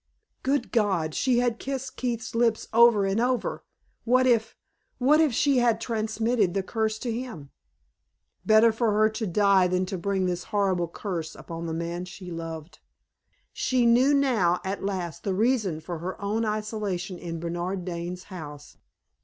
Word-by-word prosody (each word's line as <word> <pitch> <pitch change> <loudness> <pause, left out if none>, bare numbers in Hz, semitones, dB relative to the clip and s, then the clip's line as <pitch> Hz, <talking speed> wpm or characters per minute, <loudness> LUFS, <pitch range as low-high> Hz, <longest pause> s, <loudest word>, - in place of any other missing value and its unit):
Good 270 -2 0
God! 190 -9 +1
she 255 - +1
had 240 -1 +1
kissed 265 -1 -5
Keith's 235 -3 -3
lips 230 -1 +1
over 230 -3 +6
and 195 +2 0
over. 250 0 -1 0.4
What 255 +2 +3
if 230 -3 +2 0.4
what 295 +5 +4
if 310 -4 +3
she 270 +3 +2
had 235 -2 +2
transmitted 220 -3 0
the 195 - 0
curse 220 +1 -1
to 235 +2 -3
him? 225 - -6 0.9
Better 220 +1 +6
for 220 -1 0
her 215 +1 +4
to 220 0 -4
die 195 0 +4
than 185 +1 0
to 190 -1 -4
bring 195 +1 0
this 180 -1 -2
horrible 190 -4 0
curse 170 -2 -5
upon 165 0 -7
the 160 - -3
man 170 +2 -4
she 180 0 -9
loved! 165 -1 -7 0.7
She 255 -2 +1
knew 245 +4 +5
now, 220 -11 +2
at 195 +1 -3
last, 185 -4 -3
the 195 -2 -1
reason 215 -6 +1
for 170 +1 -6
her 180 +3 -5
own 215 +3 -1
isolation 210 -4 -3
in 165 -1 -5
Bernard 175 +2 -3
Dane's 180 0 -5
house. 150 -7 -10
205 Hz, 160 wpm, -26 LUFS, 180-235 Hz, 0.9 s, over